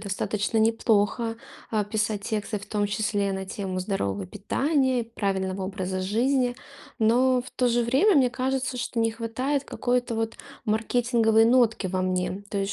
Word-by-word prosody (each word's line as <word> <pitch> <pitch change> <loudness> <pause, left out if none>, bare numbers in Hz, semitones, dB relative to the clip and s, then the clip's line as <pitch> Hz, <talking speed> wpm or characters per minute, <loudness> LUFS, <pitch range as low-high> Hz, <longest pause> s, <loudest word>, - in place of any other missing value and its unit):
достаточно 205 +1 -2
неплохо, 225 0 +2 0.3
а, 215 -2 +1
писать 210 0 -1
тексты, 210 0 -2
в 200 - -10
том 205 -1 0
числе, 205 -1 0
на 190 0 -3
тему 190 -1 -4
здорового 100 - -2
питания, 260 - 0
правильного 195 -4 -2
образа 190 -1 -3
жизни. 245 +6 +1 0.4
Но, 250 +3 +3
в 255 - -12
то 250 -1 +1
же 240 0 +2
время, 270 - +3
мне 255 -3 +4
кажется, 260 0 -2
что 245 -1 -3
не 225 0 +2
хватает 255 +5 -2
какой-то 245 -3 -1
вот 225 0 -2 0.3
маркетинговой 225 0 +2
нотки 230 -4 +3
во 185 0 -1
мне. 185 +1 -1
То 200 - -4
есть, 195 0 -1
225 Hz, 155 wpm, -26 LUFS, 200-245 Hz, 0.4 s, мне